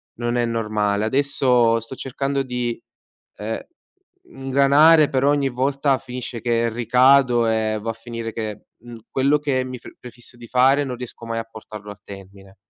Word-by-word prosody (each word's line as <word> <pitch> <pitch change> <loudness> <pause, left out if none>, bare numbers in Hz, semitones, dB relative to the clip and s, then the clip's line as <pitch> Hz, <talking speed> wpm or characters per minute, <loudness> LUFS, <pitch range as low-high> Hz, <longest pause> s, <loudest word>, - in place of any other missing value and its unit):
non 120 +1 -2
è 120 - +1
normale. 105 -2 -1
Adesso 125 -2 +2
sto 115 +4 -10
cercando 135 +1 -2
di, 125 -2 -3 0.6
ehm, 110 +2 -4 0.6
ingranare, 145 - +4
però 135 +1 +2
ogni 145 -1 +2
volta 135 +2 0
finisce 125 -2 -7
che 115 0 +1
ricado 125 +1 +4
e 110 -1 0
va 115 +2 -2
a - - -8
finire 115 0 -7
che, 110 -2 -5 0.2
mhmm, 120 +1 -11
quello 140 +3 +2
che 140 -3 0
mi 130 -1 -7
pre - - -13
prefisso 120 0 -13
di 120 -1 -12
fare 130 +4 +3
non 130 -3 -5
riesco 120 -1 -9
mai 115 0 -3
a 115 - -5
portarlo 105 -2 -10
a 100 - -12
termine. 95 0 -13
120 Hz, 165 wpm, -21 LUFS, 115-135 Hz, 0.6 s, ingranare